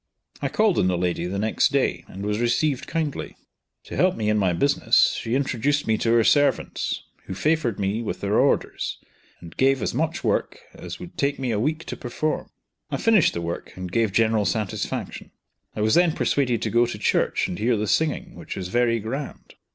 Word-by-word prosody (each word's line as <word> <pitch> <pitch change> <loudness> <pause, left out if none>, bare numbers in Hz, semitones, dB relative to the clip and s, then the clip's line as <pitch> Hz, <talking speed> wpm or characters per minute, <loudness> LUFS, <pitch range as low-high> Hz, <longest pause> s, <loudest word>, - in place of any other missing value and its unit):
I - - -1
called 215 -4 +2
on - - +3
the 90 -1 +1
lady, 90 0 -1
the 95 +2 -3
next 110 +2 +1
day, - - 0
and 100 +2 -7
was 105 +1 -1
received 120 +4 +1
kindly. 155 -3 -3 0.5
To - - -8
help 185 0 +3
me 105 -2 -1
in 105 - +2
my 95 -3 +2
business, 140 +12 +3
she 115 +2 -1
introduced 140 +2 0
me 110 - +2
to 115 - +1
her 115 -1 +5
servants, 145 +5 +1 0.2
who 95 - -6
favored 150 - 0
me 100 +3 -1
with 115 - -4
their 100 +1 +1
orders, - - 0 0.4
and 85 -1 -11
gave 135 0 +3
as - - -2
much - - -1
work, - - 0
as - - -8
would 90 - -10
take 140 0 +1
me 130 -3 -2
a 105 - 0
week 155 +7 -1
to - - -5
perform. 150 +5 -3 0.4
I - - -2
finished 220 -8 +3
the 85 - -2
work 85 0 -5
and 90 -1 -6
gave 115 -1 +1
general 110 0 +2
satisfaction. 105 -4 -3 0.5
I - - -3
was 110 +1 +2
then 175 -2 +4
persuaded 125 -7 0
to - - -1
go 120 +1 +4
to 120 - -5
church 105 - +1
and 90 - -5
hear 115 +1 +2
the 105 - -1
singing, 155 +7 0
which - - -8
was 90 -2 -5
very 120 +2 +2
grand. 130 +6 -6
115 Hz, 205 wpm, -24 LUFS, 100-140 Hz, 0.5 s, her